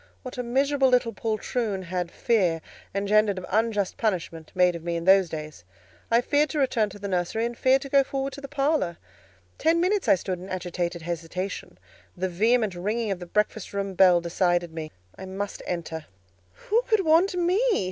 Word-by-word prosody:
What 255 0 -7
a - - +2
miserable 270 +3 +2
little 245 -2 +2
poltroon 215 -2 -2
had 180 0 -3
fear, 185 -7 +1 0.4
engendered 205 0 +2
of 185 - -5
unjust 210 -2 0
punishment, 170 -7 -2
made 180 -1 +4
of 165 - -7
me 170 0 -2
in 170 - -3
those 190 -2 +5
days! 155 - -7 0.5
I 230 +1 +4
feared 290 +3 +2
to 310 - -4
return 245 -6 +2
to 205 - -11
the 200 0 -5
nursery, 185 +4 -1
and 240 0 -3
feared 265 +3 +3
to 275 - -8
go 275 0 +5
forward 270 0 -3
to 280 - -8
the 275 - -7
parlour; 280 - 0 0.6
ten 330 +1 +3
minutes 380 +3 +1
I - - +7
stood 185 0 -4
in 185 +2 -9
agitated 175 -2 -3
hesitation; 170 - -5 0.4
the 185 +1 -1
vehement 215 +3 +2
ringing 210 +5 -2
of 190 - -2
the 175 - -8
breakfast 210 +2 -1
room 200 -1 -2
bell 180 -1 +6
decided 175 -1 0
me; 160 -1 -6 0.3
I 190 - -6
must 195 +1 -5
enter. 165 -3 -4 0.5
"Who 440 - 0
could 430 -5 +3
want 335 +4 +4
me?" 355 +2 +2
200 Hz, 190 wpm, -26 LUFS, 175-255 Hz, 0.6 s, I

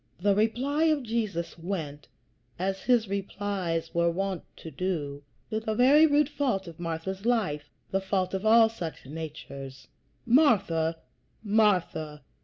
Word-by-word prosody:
The 200 +2 +3
reply 250 +9 +1
of 305 -4 +2
Jesus 215 -8 -3
went, 160 -5 -5 0.5
as 190 +1 -2
his 240 -3 +3
replies 195 -4 -3
were 170 0 +3
wont 190 +1 -2 0.2
to 160 - -9
do, 150 -7 -3 0.3
to 220 - 0
the 220 -1 -3
very 285 +7 +6
root 295 -1 +3
fault 265 -10 -1
of 165 -1 -10
Martha's 175 +3 -4
life, 190 -12 0 0.2
the 195 - +1
fault 190 -1 -1
of 190 +1 -2
all 225 +1 +7
such 175 -12 -7
natures: 140 -3 -8 0.4
"Martha, 200 - +3 0.5
Martha! 185 - +1
195 Hz, 135 wpm, -28 LUFS, 165-225 Hz, 0.5 s, all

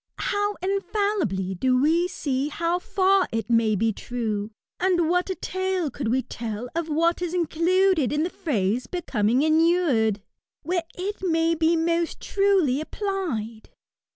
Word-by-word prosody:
How 410 0 -1
infallibly 390 - -1
do 255 +7 +1
we 330 +6 +3
see 280 -6 -2
how 335 +3 -1
fer 380 0 +2
it 225 0 -3
may 225 -2 +3
be 220 +2 +1
true; 215 -3 -3 0.3
and 355 -3 +2
what 360 +3 +1
a 375 - -1
tale 375 -5 -2
could 260 -1 -4
we 255 +3 +1
teU 225 0 -5
of 330 0 -2
what 335 +3 +1
is 355 0 -2
included 345 -1 +2
in 300 +1 +1
the 350 - -2
phrase, 235 - -1
^^ - - -38
becoming 250 - 0
inured/' 315 - +3 0.4
where 340 +2 -1
it 395 +3 -3
may 330 -2 +2
be 330 +1 +2
most 335 0 0
truly 385 -9 +2
applied! 310 - -4
325 Hz, 150 wpm, -24 LUFS, 245-365 Hz, 0.4 s, we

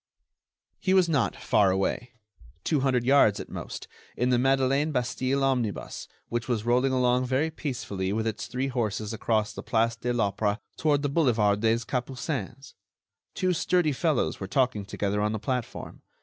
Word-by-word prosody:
He 190 0 +2
was 185 -2 +5
not 140 -10 +1
far 105 -2 +2
away—two 100 - -3
hundred 130 -2 +1
yards 125 -6 +4
at - - -7
most—in 125 +1 -5
the 125 - +3
Madeleine 135 +3 +2
Bastille 130 +1 0
omnibus, 125 -6 -1 0.2
which 120 0 -3
was 115 -4 -1
rolling 125 +3 +3
along 125 0 +2
very 140 +5 +1
peacefully 110 -11 -3
with 110 +2 -1
its 110 -2 -3
three 130 +2 -2
horses 110 -3 -2
across 110 -1 0
the - - -7
Place 115 0 +1
de 120 +1 -2
l'Opéra 105 -2 0 0.2
toward 150 -2 +1
the 145 - +1
Boulevard 115 -9 +2
des 115 +1 +1
Capucines. 130 - -4 0.6
Two 185 -1 +1
sturdy 175 -1 +2
fellows 150 -1 0
were 95 - -5
talking 125 -3 +1
together 100 +1 -2
on 105 +1 0
the 110 - -2
platform. 125 +2 -4
125 Hz, 155 wpm, -27 LUFS, 105-135 Hz, 0.6 s, was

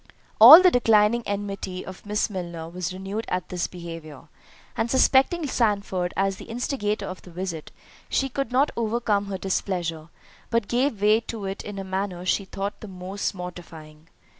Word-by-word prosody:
All 290 +11 +12
the 365 - +7
declining 225 -2 +3
enmity 200 -2 -4
of 190 +2 -11
Miss 210 0 0
Milner 170 -5 -6
was 175 +1 -4
renewed 195 +4 -5
at 180 -2 -3
this 180 -1 -2
behaviour, 165 -5 -10 0.5
and 230 - -1
suspecting 270 +6 +3
Sandford 200 -8 0
as 195 0 0
the - - -10
instigator 220 -4 -2
of 185 -1 -7
the - - -14
visit, 170 -2 -6 0.4
she 270 - +1
could 275 0 -3
not 270 +4 +2
overcome 220 -3 0
her 195 -1 -4
displeasure, 175 -4 -3 0.4
but 230 -3 0
gave 240 -4 0
way 215 +1 +5
to 225 -3 -7
it 195 +1 -4
in 205 -1 -7
a 195 - -4
manner 190 -1 -4
she 195 +1 +1
thought 195 +2 -5
the 215 - -8
most 190 +2 -4
mortifying. 165 -4 -10
195 Hz, 165 wpm, -24 LUFS, 180-225 Hz, 0.5 s, All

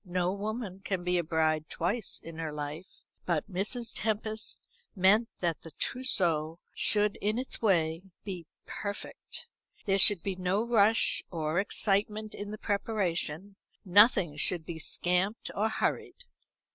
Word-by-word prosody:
No 180 -1 -1
woman 205 -1 -4
can 195 -2 -3
be 180 0 +1
a - - 0
bride 155 -1 0
twice 195 +6 -1
in 165 -1 -9
her 160 -2 -3
life; 150 +4 -7 0.3
but 170 -4 0
Mrs. 215 +5 -3
Tempest 220 0 -2 0.3
meant 210 +5 +4
that 170 -3 -1
the 165 - -10
trousseau 170 -11 +1 0.2
should, 210 -1 +3
in 210 +2 0
its 255 +1 -3
way, 165 -6 +2 0.2
be 180 -5 -6 0.2
perfect. 205 -1 -6 0.4
There 195 -2 +2
should 195 -3 +7
be 195 -2 -2
no 185 +3 0
rush 225 -1 +4
or 160 0 -1
excitement 210 +1 +1
in 205 0 -6
the 215 - -6
preparation; 200 -3 -2 0.3
nothing 190 - +5
should 170 +1 +2
be 165 0 -6
scamped 180 +6 0
or 215 +2 +1
hurried. 355 - -2
195 Hz, 140 wpm, -30 LUFS, 170-210 Hz, 0.4 s, should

